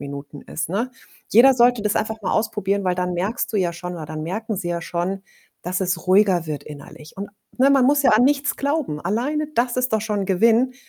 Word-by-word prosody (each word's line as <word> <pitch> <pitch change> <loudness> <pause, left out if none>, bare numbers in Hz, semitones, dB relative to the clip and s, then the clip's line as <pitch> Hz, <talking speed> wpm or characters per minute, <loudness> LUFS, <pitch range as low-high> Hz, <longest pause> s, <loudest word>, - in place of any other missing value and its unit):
Minuten 140 0 -8
ist, 160 0 -5
ne? 225 +8 -2 0.4
Jeder 260 +5 +7
sollte 245 -1 +4
das 210 0 -1
einfach 220 0 -2
mal - - -2
ausprobieren, 200 -3 -1
weil 180 -1 +1
dann 180 0 -2
merkst 195 +7 -2
du 215 - -2
ja 180 -3 +1
schon 180 +1 -7
oder 160 -2 -6
dann 155 0 -6
merken 215 +7 -4
sie 180 -2 -4
ja 170 -1 -2
schon, 180 +4 -3 0.4
dass 180 +2 -2
es 180 -1 -2
ruhiger 185 -3 +4
wird 150 -2 -4
innerlich. 150 +2 -12
Und 200 +1 -6 0.3
ne, 270 +2 +4
man 270 -2 +4
muss 285 +1 +3
ja - - +5
an 220 +4 +5
nichts 285 0 +1
glauben. 280 - -2
Alleine 270 - -1
das 245 +1 0
ist 250 -3 0
doch 215 - 0
schon 205 -3 -2
Gewinn, 230 +6 +3
200 Hz, 220 wpm, -22 LUFS, 175-240 Hz, 0.4 s, Jeder